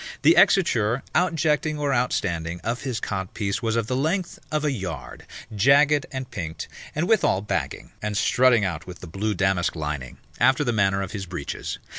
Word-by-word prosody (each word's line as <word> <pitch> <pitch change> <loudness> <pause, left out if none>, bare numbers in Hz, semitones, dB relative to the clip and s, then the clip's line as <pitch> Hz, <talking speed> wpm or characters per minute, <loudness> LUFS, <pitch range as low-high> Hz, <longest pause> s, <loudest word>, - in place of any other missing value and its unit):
The - - +6
exiture, 125 - +3
outjecting 160 -3 +1
or 145 -2 0
outstanding, 85 -9 -1
of 120 +2 -2
his 125 -5 -3
codpiece 100 0 -3
was 115 -1 0
of 115 -2 +1
the 125 - -2
length 170 +7 -1
of 155 0 0
a 150 - +2
yard, 95 - -6 0.3
jagged 140 +6 +4
and 130 -1 -5
pinked, 80 -5 -5 0.3
and 160 +4 0
withal 205 - +3
bagging, - - -3
and 105 -1 -2
strutting 125 -3 +4
out 85 -3 -4
with 90 -1 -9
the 90 - -8
blue 100 +5 -2
damask 95 -3 +1
lining, 75 -5 -4 0.2
after 130 +3 +4
the 120 -4 0
manner 100 -2 +2
of 95 - -6
his 100 -3 -5
breeches. 85 -5 -5
110 Hz, 175 wpm, -24 LUFS, 95-140 Hz, 0.3 s, The